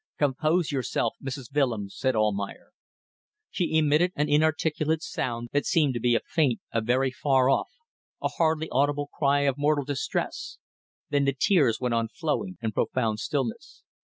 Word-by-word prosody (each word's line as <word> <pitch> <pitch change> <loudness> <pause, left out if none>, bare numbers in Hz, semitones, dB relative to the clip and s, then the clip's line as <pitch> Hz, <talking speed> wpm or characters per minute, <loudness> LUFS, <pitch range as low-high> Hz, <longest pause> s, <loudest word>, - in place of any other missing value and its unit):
"Compose 155 +4 +1
yourself, 135 -3 -1
Mrs. 135 -2 -6
Willems," 115 -9 0
said 130 -2 0
Almayer. 100 -2 -1 0.8
She 170 -3 0
emitted 155 +3 +3
an 150 +1 0
inarticulate 155 +1 +1
sound 120 -1 -3
that 145 - +1
seemed 155 -7 +3
to 120 - -2
be 120 0 +2
a - - +1
faint, 145 -8 +1
a 115 - +1
very 130 +4 +1
far 130 0 +2
off, - - +1 0.5
a - - -1
hardly 160 -1 0
audible 145 +2 +1
cry 140 -1 +2
of 140 -1 0
mortal 145 -1 +2
distress. 140 -1 -3 0.5
Then 145 -1 +2
the 140 0 0
tears 145 - +3
went 125 -2 -1
on 115 -1 +1
flowing 165 - -3
in 110 - 0
profound 110 0 -1
stillness. 130 -2 -4
140 Hz, 160 wpm, -26 LUFS, 120-150 Hz, 0.8 s, emitted